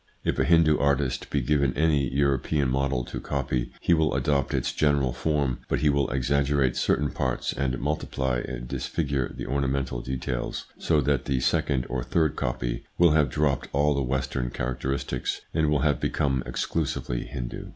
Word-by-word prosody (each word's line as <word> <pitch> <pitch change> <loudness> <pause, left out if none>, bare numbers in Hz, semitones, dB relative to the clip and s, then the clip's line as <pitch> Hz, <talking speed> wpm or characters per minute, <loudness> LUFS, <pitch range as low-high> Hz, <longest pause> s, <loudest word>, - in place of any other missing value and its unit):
If - - 0
a - - +3
Hindu 80 -3 +5
artist 70 -2 0
be 70 - 0
given 70 +1 +1
any 75 -3 +3
European 70 +1 +1
model 65 -2 0
to - - -5
copy, 65 -3 -2
he 85 - +2
will 80 -3 +2
adopt 70 -2 +1
its - - -1
general 70 -4 +2
form, 70 -5 0
but - - 0
he 75 - +4
will 70 -2 +1
exaggerate 70 0 +1
certain 70 -1 +1
parts, 65 -1 -1
and 65 -2 -1
multiply 65 -3 -1
and 60 0 -5
disfigure 70 -2 -2
the - - -6
ornamental 65 -2 -1
details, 65 -1 -3
so 80 -3 +2
that 70 -1 +1
the 65 -2 0
second 65 0 +1
or 65 -2 -2
third 80 +4 +1
copy - - -2
will 85 -2 +6
have 75 -3 +3
dropped 70 0 0
all 75 +1 +3
the 70 - 0
Western 65 -1 -1
characteristics 65 +1 -3
and 80 -2 +2
will 75 -2 +2
have 75 0 +2
become 65 -2 0
exclusively 70 -6 -2
Hindu. 60 -2 -6
70 Hz, 170 wpm, -26 LUFS, 65-75 Hz, -, will